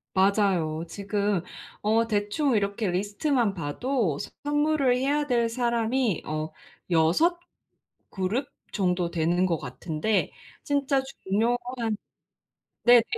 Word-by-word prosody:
맞아요. 190 -5 +2
지금 200 0 -1 0.4
어 225 +2 +3
대충 220 +6 +1
이렇게 200 0 0
리스트만 205 - 0
봐도 175 - -1 0.2
선물을 295 -3 +2
해야 285 +3 +1
될 235 -4 +2
사람이 235 - 0
어 155 +1 -3 0.4
6 175 - +3 0.7
그룹 195 +8 -1 0.3
정도 180 -3 +1
되는 175 +2 +2
것 170 -3 +1
같은데 155 +10 -1 0.3
진짜 280 -1 +1 0.2
중요한 225 +5 +2 1.3
네네. 240 -1 +7
210 Hz, 200 characters per minute, -26 LUFS, 180-250 Hz, 1.3 s, 네네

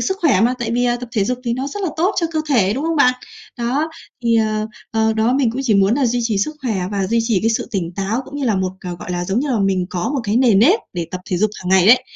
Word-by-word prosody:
sức 380 - -1
khỏe 265 - +3
mà, 240 +3 +3
tại 235 -1 -3
vì 245 +1 +1
à 240 0 +2
tập 245 - -7
thể 205 -5 +1
dục 250 +3 -2
thì 235 - 0
nó 260 +2 -3
rất 410 +4 -6
là 370 - 0
tốt 365 +5 +1
cho 335 - +1
cơ 315 - 0
thể, 215 -9 +3
đúng 280 +4 -3
không 330 -1 0
bạn? 250 -3 +4 0.4
Đó, 265 +7 0 0.4
thì, 230 0 +3
ờ, 215 -1 0 0.2
ờ, 220 0 +1
đó, 220 +2 +1
mình 260 -3 +2
cũng 250 +4 -4
chỉ 220 -5 +2
muốn 195 +2 +4
là 270 -2 +1
duy 245 +1 0
trì 225 -3 0
sức 300 +10 -2
khỏe 235 -5 -1 0.2
và 195 -2 0
duy 230 +3 +1
trì 225 -5 +1
cái 225 - +1
sự 225 - -2
tỉnh 180 -6 -3
táo, 200 +5 -1
cũng 285 - -9
như 285 - -2
là 220 -6 +1
một, 185 -1 -1
à, 180 - -6
gọi 180 - -8
là, 175 0 -2
giống 195 +7 0
như 295 - -2
là, 235 - +1
mình 190 -2 +1
có 175 +4 -2
một 275 - 0
cái 210 +2 0
nề 245 -4 +4
nếp 275 - +5
để 170 -2 -3
tập 185 - -5
thể 180 - +1
dục 215 +4 +1
hằng 180 - -7
ngày 190 -1 +4
ấy. 250 +2 +7
230 Hz, 315 wpm, -19 LUFS, 195-255 Hz, 0.4 s, ấy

